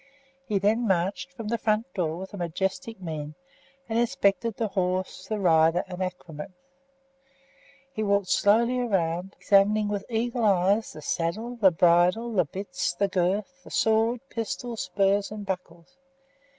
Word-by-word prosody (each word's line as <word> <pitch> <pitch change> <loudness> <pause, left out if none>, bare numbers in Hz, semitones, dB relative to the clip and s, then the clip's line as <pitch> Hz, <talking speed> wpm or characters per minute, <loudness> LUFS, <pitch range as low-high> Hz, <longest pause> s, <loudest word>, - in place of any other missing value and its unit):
He 210 - +1
then 220 +4 +2
marched 190 +7 0
from 230 -6 -7
the 235 0 -1
front 220 +4 0
door 165 -4 -1
with 190 +2 -8
a - - -6
majestic 190 - -3
mien 155 -4 -6 0.5
and 225 0 0
inspected 230 -3 +1
the 225 -2 -2
horse, 185 -1 -2
the 215 - -2
rider, 165 -2 +4
and 180 0 -7
accoutrements. 180 -2 -6 1.4
He 220 - -3
walked 200 -2 +1
slowly 235 +7 +3
round, 190 -5 -1
examining 205 +1 +3
with 205 -1 -3
eagle 235 +1 -1
eye 195 -2 +4 0.2
the 155 - -11
saddle, 210 +11 -2
the 210 -5 +5
bridle, 180 +7 +3
the 180 -5 +3
bits, 180 -3 -3
the 200 +8 +1
girth, 200 +9 -1
the - - -13
sword, 225 +2 +2
pistols, 230 +1 -4
spurs, 195 +2 +1
and 210 -1 -7
buckles. 180 +4 -6
200 Hz, 150 wpm, -26 LUFS, 180-225 Hz, 1.4 s, the